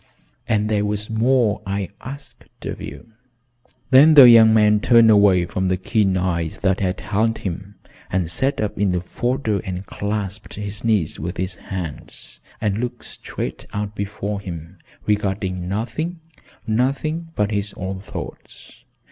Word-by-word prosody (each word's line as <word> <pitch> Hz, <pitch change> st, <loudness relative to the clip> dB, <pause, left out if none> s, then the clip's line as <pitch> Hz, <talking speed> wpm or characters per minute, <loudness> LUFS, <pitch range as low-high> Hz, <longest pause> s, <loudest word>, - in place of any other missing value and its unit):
"And 105 Hz, -3 st, +1 dB
there 105 Hz, -1 st, +1 dB
was 105 Hz, +1 st, -3 dB
more 115 Hz, -1 st, +2 dB
I 100 Hz, -2 st, -3 dB
asked 140 Hz, +4 st, -11 dB
of -, -, -5 dB
you." 115 Hz, -, -9 dB, 0.8 s
Then 150 Hz, +4 st, +8 dB
the 135 Hz, -4 st, +11 dB
young 115 Hz, -2 st, +8 dB
man 105 Hz, -1 st, +4 dB
turned 115 Hz, 0 st, +6 dB
away 100 Hz, -4 st, +5 dB
from 95 Hz, +2 st, -2 dB
the 90 Hz, 0 st, +1 dB
keen 95 Hz, 0 st, +1 dB
eyes 85 Hz, -3 st, -1 dB
that 95 Hz, 0 st, +1 dB
had 95 Hz, -2 st, -1 dB
held 110 Hz, +3 st, 0 dB
him 95 Hz, +2 st, -6 dB, 0.3 s
and 90 Hz, -2 st, 0 dB
sat 135 Hz, +11 st, 0 dB
up 105 Hz, -2 st, -2 dB
in 100 Hz, -3 st, +2 dB
the 90 Hz, -, +1 dB
fodder 120 Hz, +3 st, -1 dB
and 95 Hz, +1 st, -5 dB
clasped 100 Hz, 0 st, -4 dB
his 105 Hz, +2 st, -5 dB
knees 105 Hz, -9 st, +1 dB
with 85 Hz, +4 st, -5 dB
his 95 Hz, -1 st, -3 dB
hands 90 Hz, -6 st, -7 dB, 0.2 s
and 105 Hz, -1 st, -1 dB
looked 125 Hz, 0 st, -4 dB
straight -, -, -4 dB
out 105 Hz, 0 st, -3 dB
before 100 Hz, 0 st, -4 dB
him, 85 Hz, -1 st, -8 dB, 0.3 s
regarding 95 Hz, -3 st, -1 dB
nothing 125 Hz, -, -3 dB, 0.5 s
nothing 140 Hz, +8 st, -1 dB
but 105 Hz, 0 st, 0 dB
his 100 Hz, 0 st, -1 dB
own 95 Hz, 0 st, -4 dB
thoughts. 95 Hz, -, -10 dB
105 Hz, 150 wpm, -21 LUFS, 95-115 Hz, 0.8 s, the